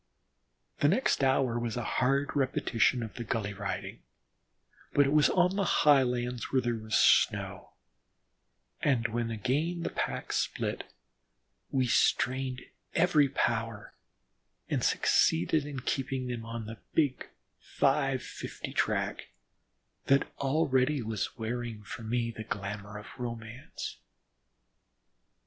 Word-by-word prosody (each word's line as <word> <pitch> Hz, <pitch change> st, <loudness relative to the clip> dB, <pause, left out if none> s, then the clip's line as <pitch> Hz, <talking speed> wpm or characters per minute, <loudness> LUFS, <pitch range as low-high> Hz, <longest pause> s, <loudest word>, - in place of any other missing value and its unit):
The 145 Hz, -, +4 dB
next 190 Hz, -, +2 dB
hour 130 Hz, -3 st, +2 dB
was 120 Hz, 0 st, -3 dB
a 120 Hz, -, -2 dB
hard 135 Hz, +6 st, +1 dB
repetition 125 Hz, -3 st, +2 dB
of 110 Hz, -, -7 dB
the 120 Hz, -, -5 dB
gully 105 Hz, -2 st, -2 dB
riding, -, -, -5 dB, 0.9 s
but 145 Hz, -, +5 dB
it 135 Hz, -, +1 dB
was 150 Hz, -1 st, +5 dB
on 180 Hz, +1 st, +3 dB
the 200 Hz, -, +1 dB
highlands 125 Hz, -, +2 dB
where 135 Hz, -, +3 dB
there 120 Hz, 0 st, 0 dB
was 110 Hz, -1 st, -3 dB
snow, -, -, +3 dB, 1.1 s
and 120 Hz, -5 st, +2 dB
when 115 Hz, 0 st, -2 dB
again 140 Hz, +10 st, -1 dB
the -, -, -2 dB
pack -, -, -3 dB
was -, -, 0 dB
split, -, -, -2 dB, 0.8 s
we 130 Hz, -2 st, +1 dB
strained 130 Hz, +1 st, +1 dB, 0.3 s
every 160 Hz, -5 st, +4 dB
power 115 Hz, -4 st, -1 dB, 0.8 s
and -, -, 0 dB
succeeded 140 Hz, -, +3 dB
in 140 Hz, -3 st, -5 dB
keeping 130 Hz, 0 st, -2 dB
them 120 Hz, -2 st, -4 dB
on 115 Hz, -1 st, -5 dB
the 110 Hz, 0 st, -8 dB, 0.2 s
big 145 Hz, -5 st, +1 dB, 0.3 s
"five 135 Hz, -2 st, +1 dB
fifty -, -, -7 dB
track," -, -, -1 dB, 0.8 s
that 135 Hz, 0 st, +2 dB
already 140 Hz, -1 st, +2 dB
was 110 Hz, -2 st, -3 dB
wearing 115 Hz, -1 st, -4 dB
for 105 Hz, -, -8 dB
me 115 Hz, +1 st, -1 dB
the 110 Hz, -1 st, -7 dB
glamour 100 Hz, 0 st, -5 dB
of 105 Hz, -, -9 dB
romance. 115 Hz, +1 st, -6 dB
125 Hz, 125 wpm, -30 LUFS, 115-140 Hz, 1.1 s, but